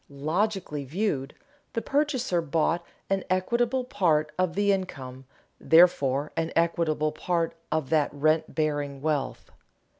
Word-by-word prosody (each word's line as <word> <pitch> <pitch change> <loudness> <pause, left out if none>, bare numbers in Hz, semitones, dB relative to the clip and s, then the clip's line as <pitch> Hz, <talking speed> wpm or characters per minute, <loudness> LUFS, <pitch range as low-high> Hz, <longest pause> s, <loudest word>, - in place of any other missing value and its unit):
Logically 155 +2 -2
viewed, 145 -2 -2 0.4
the 230 - -1
purchaser 270 - 0
bought 165 +2 0 0.2
an 195 -1 0
equitable 235 +7 +1
part 165 - +1
of 185 -1 0
the 205 0 +3
income, 135 -9 -4 0.3
therefore 150 -4 +4
an 165 0 -1
equitable 165 -2 +1
part 165 +1 -1 0.2
of 155 -3 -1
that 155 -3 +3
rent 155 +2 +1
bearing 145 -3 -1
wealth. 150 -3 -2
165 Hz, 120 wpm, -27 LUFS, 150-190 Hz, 0.4 s, therefore